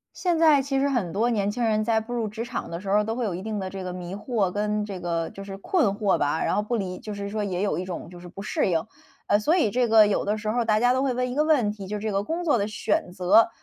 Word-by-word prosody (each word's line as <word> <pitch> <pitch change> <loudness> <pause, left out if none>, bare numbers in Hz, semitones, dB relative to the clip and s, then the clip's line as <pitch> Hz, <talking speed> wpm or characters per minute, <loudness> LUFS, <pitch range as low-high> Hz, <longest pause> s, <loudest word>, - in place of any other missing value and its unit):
现 350 -3 0
在 310 -3 +6
其 270 0 -1
实 280 +1 +2
很 235 -10 0
多 220 +7 +1
年 205 -3 0
轻 240 +3 -2
人 215 -1 +2
在 225 0 +2
步 225 +2 -8
入 230 -3 -1
职 220 +3 -5
场 240 - -5
的 170 +1 -5
时 195 - -4
候 200 - +4
儿， 210 - +3
都 225 +2 -3
会 245 - -1
有 200 -5 -2
一 180 - -4
定 215 +1 -4
的 190 -1 -4
这 195 0 -6
个 180 -1 -5
迷 180 0 -6
惑 205 -2 -1
跟 210 +2 -1
这 195 -3 -6
个 170 -2 -2
就 195 - -9
是 195 -1 -7
困 310 - +1
惑 200 -1 +1
吧， 145 +2 0
然 - - +1
后 - - +2
不 235 +3 -1
理 185 -4 -3
就 210 - -7
是 200 0 -5
说 210 0 -2
也 185 -2 -2
有 205 - 0
一 180 - -3
种 180 -1 -6
就 175 -1 -11
是 175 - -10
不 195 +3 -9
适 205 - 0
应。 165 -2 +1 0.4
呃， 205 - +4
所 300 +11 +2
以 270 - +2
这 245 +2 +1
个 220 -1 +7
有 205 - 0
的 210 +1 +1
时 215 0 -3
候， 240 +2 +1
大 215 -1 +3
家 245 +1 +4
都 260 +1 +1
会 265 -2 0
问 250 0 -1
一 - - -4
个 300 +1 +2
问 280 -10 +3
题， 200 -2 -9
就 210 +2 -3
这 215 +1 -3
个 195 0 +1
工 335 +8 -3
作 290 -7 +3
的 205 0 -1
选 210 -3 -1
择， 190 +5 +4
210 Hz, 345 characters per minute, -25 LUFS, 195-240 Hz, 0.4 s, 个